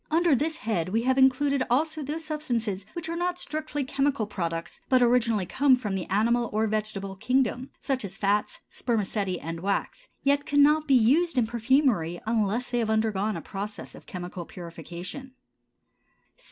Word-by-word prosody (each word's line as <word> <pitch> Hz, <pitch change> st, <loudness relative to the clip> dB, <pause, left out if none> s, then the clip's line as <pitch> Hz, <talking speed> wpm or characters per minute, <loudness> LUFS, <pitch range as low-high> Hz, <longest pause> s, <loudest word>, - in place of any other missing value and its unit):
Under 330 Hz, 0 st, +3 dB
this 315 Hz, +5 st, 0 dB
head 200 Hz, -, -1 dB
we 225 Hz, +4 st, 0 dB
have 260 Hz, +1 st, +2 dB
included 265 Hz, +1 st, +4 dB
also 310 Hz, +5 st, +1 dB
those 305 Hz, +3 st, -4 dB
substances 235 Hz, -, -2 dB
which 340 Hz, -1 st, -5 dB
are 335 Hz, -, -3 dB
not 355 Hz, +1 st, -1 dB
strictly 305 Hz, -3 st, -3 dB
chemical 275 Hz, -2 st, 0 dB
products, 170 Hz, -4 st, -4 dB
but 255 Hz, -, +5 dB
originally 230 Hz, -5 st, +3 dB
come 270 Hz, +6 st, +4 dB
from 220 Hz, -6 st, -4 dB
the 190 Hz, -2 st, -3 dB
animal 235 Hz, +4 st, +2 dB
or 215 Hz, +1 st, +1 dB
vegetable 210 Hz, -2 st, -2 dB
kingdom, 250 Hz, +4 st, 0 dB
such 265 Hz, -3 st, -1 dB
as 195 Hz, -1 st, -7 dB
fats, 205 Hz, 0 st, 0 dB
spermaceti, 205 Hz, -5 st, -1 dB
and 165 Hz, +1 st, -5 dB
wax, 200 Hz, -, -2 dB
yet 280 Hz, +1 st, +3 dB
cannot 295 Hz, +2 st, +4 dB
be 275 Hz, -, +5 dB
used 280 Hz, +7 st, +3 dB
in 245 Hz, -, +4 dB
perfumery 230 Hz, -, +1 dB
unless 225 Hz, +2 st, 0 dB
they 240 Hz, -, +1 dB
have 225 Hz, -2 st, 0 dB
undergone 220 Hz, -2 st, +1 dB
a -, -, -6 dB
process 205 Hz, +1 st, -6 dB
of -, -, -14 dB
chemical 180 Hz, -1 st, -6 dB
purification. 180 Hz, -, -8 dB
235 Hz, 165 wpm, -27 LUFS, 200-280 Hz, -, but